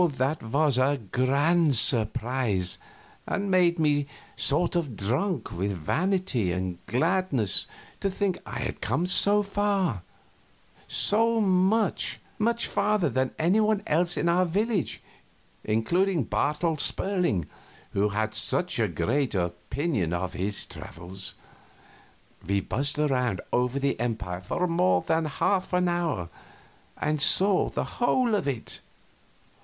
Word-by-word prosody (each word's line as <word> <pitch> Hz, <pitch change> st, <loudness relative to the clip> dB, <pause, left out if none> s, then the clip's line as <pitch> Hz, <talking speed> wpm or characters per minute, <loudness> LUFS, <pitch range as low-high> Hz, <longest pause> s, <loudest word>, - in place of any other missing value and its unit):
That 135 Hz, +5 st, 0 dB
was 140 Hz, +3 st, +1 dB
a 140 Hz, +2 st, +2 dB
grand 145 Hz, +4 st, +3 dB
surprise, 115 Hz, -4 st, +2 dB, 0.5 s
and 200 Hz, -1 st, -2 dB
made 180 Hz, -2 st, +4 dB
me 145 Hz, -3 st, +2 dB, 0.3 s
sort 165 Hz, +5 st, +2 dB
of 155 Hz, -9 st, -1 dB
drunk 130 Hz, -, -1 dB
with 100 Hz, +3 st, -2 dB
vanity 140 Hz, -, 0 dB
and 90 Hz, -1 st, -4 dB
gladness 150 Hz, -, 0 dB, 0.3 s
to 195 Hz, -, 0 dB
think 190 Hz, -1 st, -1 dB
I -, -, -6 dB
had -, -, -4 dB
come 175 Hz, -, 0 dB
so 205 Hz, +3 st, +4 dB
far 195 Hz, -, 0 dB, 0.9 s
so 230 Hz, +2 st, +2 dB
much, 195 Hz, +2 st, +2 dB, 0.2 s
much 235 Hz, +2 st, +1 dB
farther 200 Hz, -6 st, +1 dB
than 130 Hz, +2 st, +1 dB
anybody 210 Hz, +5 st, +2 dB
else 175 Hz, +3 st, +1 dB
in -, -, 0 dB
our 175 Hz, +2 st, +3 dB
village, 200 Hz, +3 st, -1 dB, 0.6 s
including 170 Hz, -, +1 dB
Bartel 150 Hz, +9 st, 0 dB
Sperling, 180 Hz, -, 0 dB, 0.5 s
who 105 Hz, +2 st, +2 dB
had 110 Hz, +1 st, -1 dB
such 145 Hz, +9 st, -1 dB
a 110 Hz, -, +3 dB
great 110 Hz, -, -1 dB
opinion 90 Hz, -, -2 dB
of 90 Hz, +1 st, -2 dB
his 100 Hz, +2 st, -2 dB
travels. 90 Hz, +4 st, -8 dB, 1.1 s
We 100 Hz, +3 st, 0 dB
buzzed 140 Hz, +9 st, -2 dB
around 125 Hz, -9 st, +1 dB
over 125 Hz, +2 st, +1 dB
that 140 Hz, -3 st, -1 dB
empire 110 Hz, -7 st, -3 dB
for 135 Hz, -, -1 dB
more 95 Hz, -, +2 dB
than 160 Hz, 0 st, +1 dB
half 185 Hz, +6 st, 0 dB
an 180 Hz, 0 st, +2 dB
hour, 165 Hz, -, -1 dB, 0.7 s
and 150 Hz, -1 st, -1 dB
saw 195 Hz, +4 st, +4 dB
the -, -, -2 dB, 0.2 s
whole 245 Hz, -1 st, +2 dB
of 205 Hz, -8 st, 0 dB
it. 130 Hz, -5 st, -4 dB
145 Hz, 125 wpm, -27 LUFS, -, 1.1 s, made